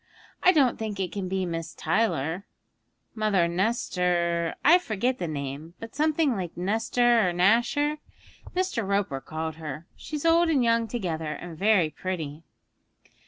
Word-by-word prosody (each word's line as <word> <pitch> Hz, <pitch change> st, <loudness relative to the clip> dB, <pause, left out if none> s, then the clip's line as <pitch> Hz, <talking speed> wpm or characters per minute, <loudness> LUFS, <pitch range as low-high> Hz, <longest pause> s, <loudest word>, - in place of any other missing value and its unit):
I 370 Hz, -, +6 dB
don't 275 Hz, -8 st, +3 dB
think 215 Hz, -3 st, -4 dB
it 185 Hz, -2 st, -2 dB
can 195 Hz, -2 st, -4 dB
be 190 Hz, 0 st, -1 dB
Miss 165 Hz, -2 st, -5 dB
Tyler; 170 Hz, -2 st, 0 dB, 0.7 s
Mother 210 Hz, -6 st, +2 dB
Nestor 175 Hz, -3 st, 0 dB
I 345 Hz, +4 st, +8 dB
forget 245 Hz, -, -1 dB
the 175 Hz, -, -2 dB
name, 145 Hz, +2 st, -5 dB
but 225 Hz, 0 st, -9 dB
something 305 Hz, -2 st, +2 dB
like 180 Hz, -4 st, -5 dB
Nestor 225 Hz, +3 st, +2 dB
or -, -, -3 dB
Nasher 240 Hz, -, +2 dB, 0.6 s
Mr. 370 Hz, -11 st, 0 dB
Roper 195 Hz, -9 st, -1 dB
called 160 Hz, +3 st, -5 dB
her. 155 Hz, 0 st, -7 dB
She's 300 Hz, 0 st, -6 dB
old 335 Hz, +1 st, +4 dB
and 280 Hz, -6 st, +3 dB
young 230 Hz, -1 st, +2 dB
together, 165 Hz, -9 st, -3 dB
and 175 Hz, 0 st, -8 dB
very 190 Hz, -3 st, +3 dB
pretty.' 160 Hz, -3 st, -5 dB
195 Hz, 145 wpm, -26 LUFS, 165-235 Hz, 0.7 s, I